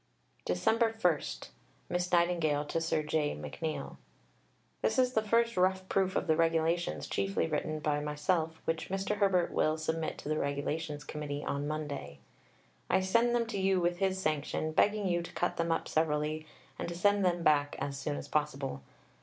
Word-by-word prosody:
Dec. 90 0 -1 0.4
1 170 -5 0 0.3
(Miss 180 0 -1
Nightingale 170 -4 +2
to 165 +3 -2
Sir 160 -1 0
J. 150 -1 0
McNeill). 75 - -5 0.8
This - - +1
is 255 -1 +3
the 220 - +3
first 230 +2 +2
rough 185 +1 +2
proof 190 -1 +1
of - - +1
the 160 - +3
Regulations 165 - +1
chiefly 100 0 0
written 155 0 -2
by 150 -1 0
myself, 160 +2 -1
which 165 0 -2
Mr. 195 +2 -1
Herbert 195 -4 +3
will 155 0 +2
submit 160 0 -2
to - - -9
the 155 0 0
Regulations 145 +1 -2
Committee 145 -1 -5
on 140 +1 -2
Monday. 145 - -4 0.7
I - - +4
send 230 +6 +3
them 235 -1 +2
to 225 -3 -3
you 190 -1 +3
with 175 0 0
his 190 -1 +1
sanction, 155 -1 -1
begging 205 +4 +2
you 175 -1 +1
to 170 - -9
cut 175 - -1
them 170 0 0
up 165 - 0
severely, 155 0 0 0.3
and - - -3
to 170 - -5
send 205 +3 +3
them 175 -2 +1
back 145 -2 +3
as 140 -1 -3
soon 145 +1 -3
as - - -6
possible. 140 - -1
160 Hz, 175 wpm, -32 LUFS, 150-185 Hz, 0.8 s, I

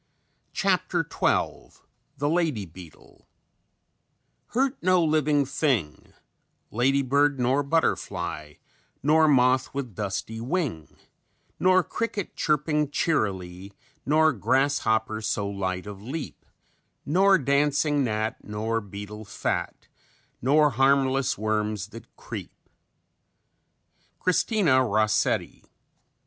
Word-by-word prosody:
CHAPTER - - 0
XII - - -1 0.4
THE 145 +1 -1
LADY 155 - 0
BEETLE 85 -1 -15 1.3
"_Hurt 265 +1 +2
no 185 -1 +3
living 150 -2 +2
thing: 130 - -2 0.6
Ladybird, 135 +3 +2
nor 130 +3 +2
butterfly, 85 - -2 0.5
Nor 155 +2 +4
moth 130 -2 +3
with 130 -6 -4
dusty 105 +3 -4
wing, 130 - -3 0.6
Nor 185 0 +4
cricket 215 -2 -4
chirping 150 -1 0
cheerily, 100 - -2 0.3
Nor 155 +2 +3
grasshopper 110 -5 +1
so 105 -1 -1
light 95 -2 -3
of 100 -1 -9
leap, 135 +7 -7 0.6
Nor 190 +5 +4
dancing 145 +1 +1
gnat, 110 -2 -2
nor 110 +2 -2
beetle 105 +1 -8
fat, - - -4 0.5
Nor 150 +4 +4
harmless 135 +1 +2
worms 105 -1 -2
that 115 +1 -11
creep._" - - -7 1.7
CHRISTINA 180 - +2
ROSSETTI. 110 -1 0
130 Hz, 90 wpm, -26 LUFS, 105-150 Hz, 1.7 s, Nor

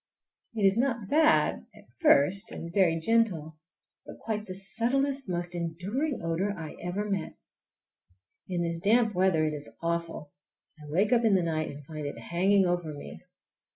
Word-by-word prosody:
It 215 - -2
is 195 +3 +4
not 235 -6 -1
bad—at 315 +1 +2 0.2
first, 195 - +4
and 170 0 -7
very 175 -4 +3
gentle, 165 -7 +1 0.4
but - - -11
quite 215 -1 -4
the 185 - -6
subtlest, 255 +6 +1
most 175 0 -3
enduring 185 - -3
odor 180 +5 -1
I 160 -2 -7
ever 190 +4 -3
met. 195 -5 -3 1.1
In 175 -2 -1
this 170 0 -3
damp 220 +4 +3
weather 180 -4 +2
it 155 - -1
is 145 -5 -7
awful. 170 -3 -3 0.5
I 150 -1 -12
wake 195 +9 +2
up 240 -1 +3
in 215 -3 +4
the 185 - +2
night 160 -1 -1
and 145 0 -10
find 155 -1 -6
it - - -6
hanging 190 +3 +2
over 175 -3 -1
me. 145 - -10
185 Hz, 160 wpm, -28 LUFS, 165-215 Hz, 1.1 s, is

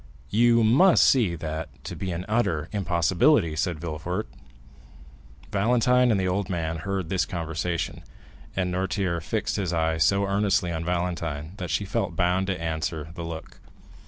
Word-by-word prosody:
"You 115 +1 +4
must 140 +12 +6
see 110 -10 +3
that 80 0 -6
to - - -6
be 95 -2 -4
an 85 +2 -4
utter 95 -9 0
impossibility," 90 - +2
said 80 0 -1
Villefort. 85 +5 -4 1.2
Valentine 125 +4 +3
and 105 -4 +3
the 95 - 0
old 100 +2 -1
man 80 -3 -2
heard 95 -1 -3
this 95 -1 +1
conversation, 85 0 -3 0.5
and 90 -1 0
Noirtier 90 -1 -1
fixed 110 +6 -2
his 95 -4 -1
eye 80 -1 +1
so 100 +5 +3
earnestly 100 -3 +1
on 80 0 -3
Valentine 85 -3 -2
that 90 -3 -5
she 100 - 0
felt 105 -3 -2
bound 90 +2 +1
to 95 -3 -2
answer 80 -1 -3
to 80 - -13
the 85 -1 -6
look. 80 -1 -8
90 Hz, 160 wpm, -26 LUFS, 80-100 Hz, 1.2 s, must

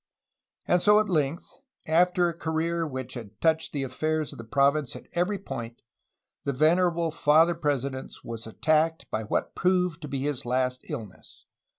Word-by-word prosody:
And 180 - +3
so 210 +2 +6
at 215 - 0
length, 155 0 0 0.4
after 175 +2 +3
a 170 - -2
career 165 0 -1
which 130 -3 -6
had 110 -4 -9
touched 160 0 +1
the 140 -2 -2
affairs 155 +4 -1
of - - -12
the - - -6
province 140 +4 +1
at - - -10
every 180 +4 0
point, 120 -11 -7 0.6
the 140 - -1
venerable 170 +3 +3
Father 160 +2 +4
President 140 -4 -2
was 115 -1 -6
attacked 155 +7 +1
by 110 - -1
what 110 - -2
proved 180 -2 +1
to 150 - -6
be 135 -1 -3
his 145 -3 -2
last 125 +1 0
illness. 110 -11 -9
155 Hz, 165 wpm, -27 LUFS, 130-170 Hz, 0.6 s, so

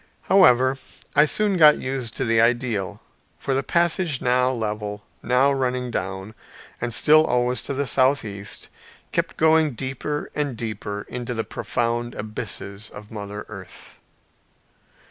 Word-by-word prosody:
However, 130 -8 +4 0.4
I 150 - +7
soon 205 +4 +1
got 150 -3 +7
used 130 -3 -3
to - - -1
the 115 -1 +3
ideal 115 -4 0 0.3
for 135 - -2
the 135 - +1
passage 170 -2 +1
now 125 +1 +2
level, 105 -4 -4 0.2
now 125 +4 +3
running 125 -2 -1
down, 95 +1 -4 0.5
and 120 0 -2
still 155 +6 +5
always 125 -4 +1
to 140 - -4
the 140 +1 -1
southeast, 120 -7 0 0.4
kept - - -1
going 160 -2 +4
deeper 135 +4 -4
and 145 -5 -2
deeper 105 -2 -4
into 125 0 -5
the 115 - -1
profound 120 +1 -2
abysses 105 -1 -4
of 105 0 -12
Mother 105 -1 -6
Earth. 100 -3 -12
125 Hz, 135 wpm, -23 LUFS, 110-140 Hz, 0.5 s, I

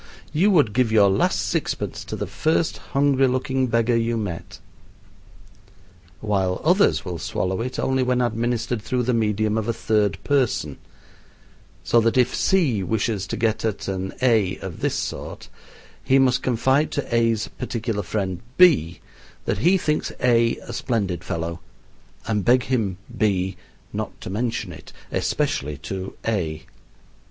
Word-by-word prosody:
You 185 +7 +4
would 150 - +4
give 120 -1 +2
your 100 -3 +5
last 95 - +2
sixpence - - -2
to - - -5
the - - -3
first 155 - 0 0.2
hungry 140 -1 +4
looking 130 +1 0
beggar 115 0 +2
you 115 0 +1
met;" 100 -1 -5 1.6
while 95 -4 0
others 180 - +3
will 90 -3 -4
swallow 95 +3 -2
it 125 +2 -4
only 130 0 +1
when 125 0 +1
administered 120 -1 -1
through 125 +3 -1
the 125 +1 +1
medium 110 -1 +1
of 110 - -4
a 115 - +1
third 105 -3 +1
person, 125 - 0 1.0
so 120 - +4
that 115 +2 +1
if 125 - +3
C 155 - +2
wishes 100 +1 -1
to - - -3
get 110 -1 0
at 110 -3 -2
an 95 0 -3
A 110 -7 +3
of 95 -4 -7
this - - 0
sort, - - -5 0.5
he 135 - +4
must 130 -2 +3
confide 130 +4 +2
to 145 -4 -2
A's 115 -2 +2
particular 115 -4 -2
friend 95 -2 -3 0.2
B 105 - +5 0.4
that - - -1
he 180 - +4
thinks 150 -4 -1
A 115 -2 +3
a - - -8
splendid 100 -9 -1
fellow, 85 -2 -3 0.7
and 105 -3 0
beg 125 +3 +4
him, 110 -8 -1 0.2
B, 95 -3 +1 0.4
not - - -5
to - - -6
mention 115 +3 -2
it, - - -13 0.2
especially 75 +1 -1
to 95 +5 -6
A. 80 -8 -2
115 Hz, 150 wpm, -23 LUFS, 95-125 Hz, 1.6 s, your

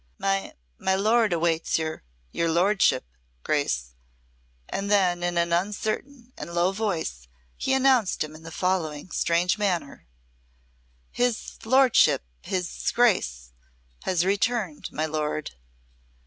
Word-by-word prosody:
"My 195 0 -1 0.2
my 190 - +1
lord 215 +2 +3
awaits 165 -1 +1
your 160 -1 -3 0.3
your 165 - 0
lordship 175 -4 +3 0.4
Grace," - - -1 0.7
and 200 +1 -3
then 185 -4 +3
in 175 0 -1
an 170 0 +1
uncertain 220 +7 -2
and - - -7
low 175 +2 +3
voice 175 - -3 0.3
he 265 - -2
announced 260 -10 +3
him 155 0 -8
in 155 - -12
the 165 - -9
following 175 -2 -2
strange 175 +3 +1
manner: 175 - -2 1.0
"His 245 -2 -1
lordship 260 - +5 0.2
his 180 -2 -2
Grace 65 - +2 0.5
has 180 -1 +1
returned, 200 -4 -1
my 155 - -1
lord," 155 -1 -2
he - - -22
said. 65 - -33
180 Hz, 125 wpm, -26 LUFS, 160-210 Hz, 1.0 s, lordship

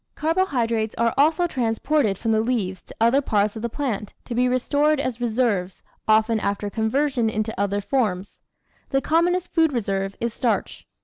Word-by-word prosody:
Carbohydrates 245 - 0
are 230 0 +2
also 320 +5 +3
transported 245 - 0
from 225 +1 -1
the 220 0 +3
leaves 205 -6 -1
to - - -14
other 235 +5 +4
parts 210 -5 +1
of 220 - -6
the 235 - -2
plant 225 -6 -4
to 240 - -5
be 250 +1 +2
re 255 - +2
stored 295 +3 +1
as 255 -3 -3
reserves, 220 -6 -1 0.2
often 220 +1 +3
after 205 0 -2
conversion 240 +2 0
into 215 0 -2
other 200 0 0
forms. 205 -5 -1 0.5
The 270 - +2
commonest 350 +4 +1
food 325 -2 +3
reserve 195 -5 -2
is 235 -1 -2
starch. 240 -1 -2
230 Hz, 170 wpm, -23 LUFS, 215-275 Hz, 0.5 s, other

